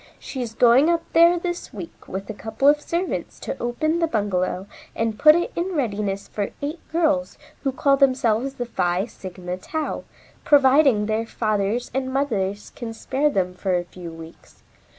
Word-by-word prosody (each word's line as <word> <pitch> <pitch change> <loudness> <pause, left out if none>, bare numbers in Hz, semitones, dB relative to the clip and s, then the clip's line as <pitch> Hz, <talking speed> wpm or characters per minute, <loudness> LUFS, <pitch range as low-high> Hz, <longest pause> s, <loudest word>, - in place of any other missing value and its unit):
She 265 - -6
is 225 -2 -5
going 250 +7 +5
up 335 -1 +1
there 340 +1 +6
this 350 0 -4
week 180 -5 -10
with 195 +1 -5
a 220 - -5
couple 220 +6 -1
of 295 +1 +5
servants 345 +4 -3
to - - -4
open 310 +8 0
the 330 - +2
bungalow 195 - -1 0.3
and 225 -1 -1
put 305 0 +8
it 345 - 0
in 355 +1 -2
readiness 205 -7 -2
for 205 -2 -3
eight 300 +4 -4
girls 305 -5 +1 0.2
who 270 - 0
call 275 +1 +2
themselves 260 -1 +2
the 245 - -3
Phi 180 -4 0
Sigma 180 -4 -7
Tau, 315 - -4 0.4
providing 270 -5 +5
their 220 +1 -1
fathers 215 +1 -1
and 260 0 -1
mothers 210 -8 -1
can 225 -2 -6
spare 275 +6 0
them 185 -8 0
for 185 0 -1
a 175 - -2
few 175 -1 -9
weeks. 165 0 -13
240 Hz, 170 wpm, -23 LUFS, 200-290 Hz, 0.4 s, put